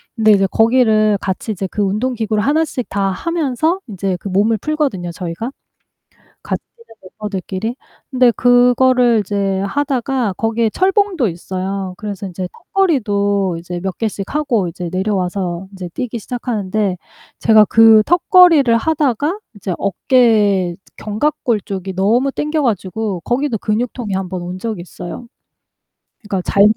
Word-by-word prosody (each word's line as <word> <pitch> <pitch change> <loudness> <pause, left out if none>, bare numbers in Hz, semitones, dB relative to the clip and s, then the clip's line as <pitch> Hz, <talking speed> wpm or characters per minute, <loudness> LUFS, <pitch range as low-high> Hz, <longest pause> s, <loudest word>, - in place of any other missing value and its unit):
근데 220 -2 +4
이제 195 -1 +4
거기를 220 -3 +3
같이 195 +3 -3
이제 195 -1 -3
그 210 - -3
운동기구를 215 +1 0
하나씩 290 -1 0
다 195 -1 0
하면서 325 - -1
인제 195 -3 -3
그 200 - -5
몸을 210 +4 +2
풀거든요 275 - -2
저희가 180 +8 -5 0.9
같이 - - -3
뛰는 465 - -20 0.3
멤버들끼리. 205 +2 -4 0.4
근데 250 -2 +4
그거를 245 -1 +4
이제 195 -1 -1
하다가 260 -1 -1
거기에 225 +2 0
철봉도 375 - +1
있어요. 185 +2 -4
그래서 205 -2 -5
이제 180 0 -5 0.3
턱걸이도 205 - +1
이제 175 +1 -6
몇 190 -1 -4
개씩 215 0 -4
하고 245 -11 +1
이제 170 +1 -5
내려와서 185 -2 -2
인제 185 -3 -7
뛰기 245 -2 -4
시작하는데 210 -5 -2 0.4
제가 220 -1 +6
그 225 -1 +6
턱걸이를 345 - +5
하다가 300 - 0 0.2
이제 195 -2 -4
어깨 200 -4 +2 0.2
견갑골 220 0 -1
쪽이 190 -1 -5
너무 235 +8 +2
땡겨 300 +2 -1
가지고 205 -3 -2
거기도 245 - -1
근육통이 220 0 -2
1 185 -1 -3
온 180 +1 -6
적이 215 -4 -4
있어요. 180 +6 -8 0.9
그러니까 200 -3 -3
잘 200 - +4
215 Hz, 310 characters per minute, -17 LUFS, 190-250 Hz, 0.9 s, 제가